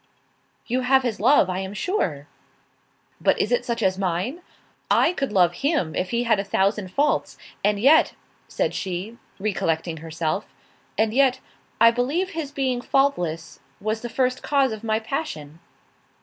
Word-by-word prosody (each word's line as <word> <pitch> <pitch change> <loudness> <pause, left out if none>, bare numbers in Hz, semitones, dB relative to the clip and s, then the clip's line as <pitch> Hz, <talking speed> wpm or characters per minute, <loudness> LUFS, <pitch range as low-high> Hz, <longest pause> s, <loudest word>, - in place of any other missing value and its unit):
"You 250 +2 -1
have 265 +1 +3
his 235 -6 -2
love, 240 -1 +5
I 185 0 -2
am 190 +1 -5
sure." 180 - -1 1.0
"But - - +3
is - - 0
it - - +2
such 235 -1 -2
as 190 0 +1
mine? 195 - -2 0.5
I 340 - +4
could 275 -8 -2
love 180 -4 +4
him 280 - +1
if 185 - -2
he 235 0 0
had 230 -4 +2
a - - 0
thousand 200 0 0
faults. 290 +9 0 0.3
And 205 0 +2
yet," 285 +8 +5 0.3
said - - -1
she, 190 +5 -4 0.2
recollecting 170 -5 -1
herself, 160 +4 -3 0.5
"and 220 0 +2
yet, 260 0 +3 0.4
I 230 0 +7
believe 285 +11 -1
his 315 -4 -4
being 260 -3 -1
faultless, 175 - 0 0.2
was 215 +2 -2
the 240 - -5
first 255 +1 0
cause 275 -3 +2
of 220 0 -6
my 220 -1 +1
passion." 220 - -5
225 Hz, 160 wpm, -23 LUFS, 185-270 Hz, 1.0 s, I